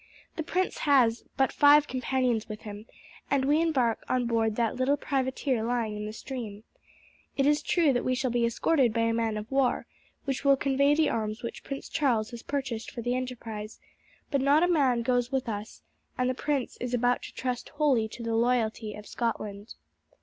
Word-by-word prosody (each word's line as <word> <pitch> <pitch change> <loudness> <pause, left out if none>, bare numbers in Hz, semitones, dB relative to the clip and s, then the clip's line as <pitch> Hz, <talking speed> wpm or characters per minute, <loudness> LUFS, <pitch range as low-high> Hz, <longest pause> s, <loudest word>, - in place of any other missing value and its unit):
The - - -2
prince 365 +4 -1
has 245 -6 +3
but 270 -1 +3
five 290 +1 +6
companions 250 -3 0
with 215 0 -6
him, 210 +1 -9 0.4
and 275 -2 +2
we 295 +3 +3
embark 260 -9 +1
on 255 -1 +1
board 225 -2 +1
that 230 -1 0
little 260 +3 +2
privateer 260 -3 -1
lying 230 -2 -1
in 210 0 -4
the - - -5
stream. 220 -3 -7 0.7
It 275 - +3
is 295 +1 +3
true 310 -2 +2
that 245 - 0
we 255 - +1
shall 255 0 -1
be 240 0 +1
escorted 240 +1 +2
by 230 - +2
a 230 0 +2
man 225 -2 0
of 215 +3 -7
war, 270 -2 +1 0.4
which 270 -1 -2
will 275 -1 +5
convey 280 +1 +3
the 310 -1 +2
arms 215 +1 -3
which 235 - -6
Prince 275 0 -6
Charles 245 -7 0
has 235 -1 -8
purchased 260 -5 -3
for 235 - -7
the 245 +1 0
enterprise; 230 -4 -5 0.5
but 280 -3 +2
not 285 +4 +4
a - - +4
man 270 -9 +2
goes 245 +1 +1
with 265 -1 -1
us, 210 0 -6 0.3
and 250 - +1
the 255 - +1
prince 275 0 -2
is 245 0 -2
about 245 0 +2
to - - -10
trust 250 -1 -3
wholly 285 -7 +2
to 235 +2 -9
the 230 0 -2
loyalty 225 -2 0
of 210 - -10
Scotland." 215 -3 -4
245 Hz, 195 wpm, -28 LUFS, 225-275 Hz, 0.7 s, five